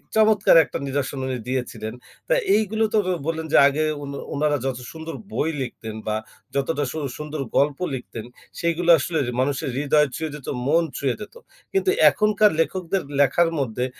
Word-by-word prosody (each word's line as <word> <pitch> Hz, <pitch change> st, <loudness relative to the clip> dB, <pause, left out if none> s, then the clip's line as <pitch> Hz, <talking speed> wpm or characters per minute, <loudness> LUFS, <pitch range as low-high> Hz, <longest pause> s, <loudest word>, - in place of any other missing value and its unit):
চমৎকার 215 Hz, -4 st, +5 dB
একটা -, -, -5 dB
নিরসন 140 Hz, 0 st, -2 dB
উনি 130 Hz, -1 st, -2 dB
দিয়েছিলেন। 125 Hz, -3 st, -3 dB, 0.3 s
তো -, -, +3 dB, 0.2 s
এইগুলো 220 Hz, +1 st, +1 dB
তো -, -, +4 dB, 0.3 s
বললেন 160 Hz, -1 st, -2 dB
যে, -, -, +7 dB
আগে 145 Hz, +2 st, 0 dB, 0.2 s
উনা 140 Hz, 0 st, -6 dB, 0.2 s
উনারা 145 Hz, 0 st, +1 dB
যত 130 Hz, -2 st, -1 dB
সুন্দর 160 Hz, 0 st, -7 dB, 0.2 s
বই 160 Hz, -, 0 dB
লিখতেন 110 Hz, -3 st, -6 dB
বা 110 Hz, -, 0 dB, 0.4 s
যতটা 145 Hz, +2 st, 0 dB
সু 160 Hz, -, -6 dB, 0.2 s
সুন্দর 150 Hz, -1 st, -5 dB, 0.2 s
গল্প 145 Hz, +1 st, +2 dB, 0.2 s
লিখতেন 120 Hz, -2 st, -7 dB, 0.3 s
সেগুলো 170 Hz, +1 st, 0 dB
আসলে 160 Hz, +4 st, -2 dB, 0.2 s
মানুষের 135 Hz, 0 st, -1 dB
হৃদয় 150 Hz, +1 st, +3 dB
ছুঁয়ে 160 Hz, -2 st, -4 dB
যেত, 145 Hz, -, -11 dB, 0.2 s
মন 165 Hz, +3 st, +4 dB
ছুঁয়ে 135 Hz, -3 st, 0 dB
যেত। 210 Hz, -, -9 dB, 0.4 s
কিন্তু 390 Hz, -1 st, +1 dB, 0.2 s
এখনকার 210 Hz, 0 st, +3 dB
লেখকদের 185 Hz, +2 st, 0 dB, 0.2 s
লেখার 165 Hz, +5 st, +4 dB
মধ্যে 125 Hz, -2 st, -1 dB
150 Hz, 160 wpm, -23 LUFS, 135-170 Hz, 0.4 s, যে